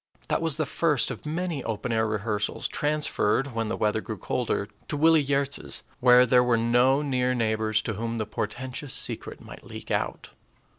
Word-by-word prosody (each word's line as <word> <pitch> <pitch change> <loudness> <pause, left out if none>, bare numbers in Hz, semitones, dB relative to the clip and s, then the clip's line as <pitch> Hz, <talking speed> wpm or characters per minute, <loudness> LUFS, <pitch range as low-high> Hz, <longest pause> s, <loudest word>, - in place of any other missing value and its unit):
That - - +1
was 165 -3 0
the 155 - 0
first 150 -2 +1
of - - -8
many 165 -3 -2
open 115 +2 -3
air 110 -1 +1
rehearsals, 105 -1 -2
transferred, 145 -4 0
when 115 -1 -1
the 115 - -2
weather 110 0 +1
grew 110 -1 -6
colder, 110 0 -2 0.2
to 150 - -3
Willie 160 0 +5
Giertz's, 140 0 -2 0.2
where 125 -1 +7
there 125 0 +4
were 120 -2 +2
no 120 +5 +3
near 125 -2 0
neighbors 110 -2 +1
to 110 - -2
whom 115 +3 -3
the 110 - -1
portentous 125 +7 -4
secret - - -1
might - - -12
leak - - -9
out. - - -2
125 Hz, 180 wpm, -26 LUFS, 110-140 Hz, 0.2 s, where